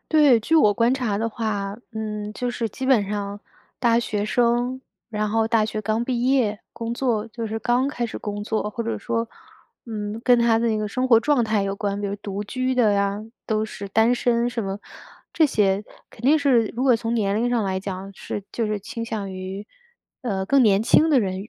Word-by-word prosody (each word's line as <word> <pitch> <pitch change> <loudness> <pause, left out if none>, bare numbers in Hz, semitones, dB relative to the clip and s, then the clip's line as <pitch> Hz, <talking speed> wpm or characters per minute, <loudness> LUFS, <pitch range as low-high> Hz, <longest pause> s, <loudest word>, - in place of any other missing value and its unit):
对， 290 -7 +5
据 320 +9 0
我 210 -9 +5
观 235 +1 +3
察 235 -6 -1
的 230 - 0
话， 210 -3 -3 0.2
嗯， 210 -1 -4
就 245 +3 -2
是 235 -2 -2
基 260 +6 -5
本 230 -7 +4
上 205 0 -4 0.4
大 235 -1 +3
学 210 -3 -2
生， 245 +3 +1 0.3
然 215 -2 -1
后 225 +1 +1
大 225 -2 +3
学 215 0 -3
刚 220 +3 0
毕 245 -1 -1
业， 240 -6 +2
工 230 0 -4
作 235 -4 0
就 230 0 -5
是 220 +1 -3
刚 245 +4 +1
开 245 -4 -3
始 - - -6
工 205 0 -4
作， 215 -1 -1
或 230 - -4
者 230 0 -3
说， 230 -1 -2 0.6
嗯， 215 -1 -4
跟 245 -1 +5
他 235 -1 +4
的 230 0 +1
一 220 - +1
个 215 - -1
生 255 +5 -1
活 230 -3 +6
状 285 -2 +2
态 215 -2 +1
有 195 0 -2
关， 200 0 -2
比 205 - -2
如 200 - -3
独 200 0 -5
居 255 +4 -1
的 215 -5 +3
啊， 200 +1 -1 0.3
都 215 -1 0
是 200 -2 -7
单 225 +4 +3
身 240 -1 +1
什 235 -2 -3
么， 195 +1 -3 0.5
这 320 - +4
些 200 -6 +1 0.3
肯 - - -16
定 290 +5 +5
是 255 -6 +3
如 250 - -1
果 260 -2 +5
从 230 +1 -2
年 205 -3 +1
龄 240 +2 +1
上 240 -3 +1
来 190 -1 -1
讲 195 0 -6
是 205 - -5
就 230 -2 -1
是 210 -1 -1
倾 230 +2 -6
向 210 -4 -4
于， 190 +2 -6 0.6
呃， 195 -6 -1
更 275 +4 +4
年 205 -2 +4
轻 310 +7 +5
的 275 - +5
人 195 +1 -3
225 Hz, 235 characters per minute, -23 LUFS, 205-240 Hz, 0.6 s, 活